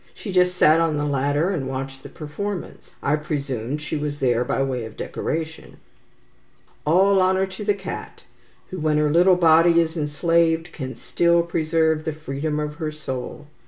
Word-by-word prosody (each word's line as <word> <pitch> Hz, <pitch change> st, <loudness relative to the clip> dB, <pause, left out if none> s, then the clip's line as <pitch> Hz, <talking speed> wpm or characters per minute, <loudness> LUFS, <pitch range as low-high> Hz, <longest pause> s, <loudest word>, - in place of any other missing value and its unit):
She 205 Hz, -, -7 dB
just 180 Hz, -1 st, +3 dB
sat 160 Hz, -1 st, +5 dB
on 160 Hz, -2 st, +1 dB
the 145 Hz, -, -1 dB
ladder, 145 Hz, +5 st, +1 dB
and 145 Hz, -9 st, -2 dB
watched 135 Hz, 0 st, -5 dB
the -, -, -10 dB
performance. 175 Hz, +5 st, -6 dB
I 150 Hz, +2 st, +2 dB
presumed 140 Hz, -2 st, -3 dB
she 155 Hz, -, -3 dB
was 145 Hz, -1 st, -3 dB
there 125 Hz, -2 st, +2 dB
by 135 Hz, -, 0 dB
way 130 Hz, -3 st, -2 dB
of 110 Hz, -1 st, -9 dB
decoration." 160 Hz, 0 st, -5 dB, 1.1 s
All 190 Hz, +4 st, +4 dB
honour 190 Hz, +1 st, +2 dB
to 190 Hz, +2 st, -8 dB
the 205 Hz, -1 st, +1 dB
cat, 190 Hz, -2 st, -8 dB, 0.5 s
who, 185 Hz, -, -5 dB
when 155 Hz, -1 st, +1 dB
her 150 Hz, -1 st, +2 dB
little 180 Hz, +3 st, +5 dB
body 170 Hz, 0 st, +5 dB
is 165 Hz, 0 st, 0 dB
enslaved, 165 Hz, +2 st, +1 dB
can 130 Hz, -3 st, -6 dB
still 170 Hz, 0 st, +2 dB
preserve 160 Hz, -1 st, +1 dB
the 160 Hz, -, -2 dB
freedom 150 Hz, 0 st, -3 dB
of 150 Hz, 0 st, -4 dB
her 155 Hz, -2 st, -3 dB
soul. 145 Hz, -1 st, -6 dB
155 Hz, 170 wpm, -23 LUFS, 145-170 Hz, 1.1 s, sat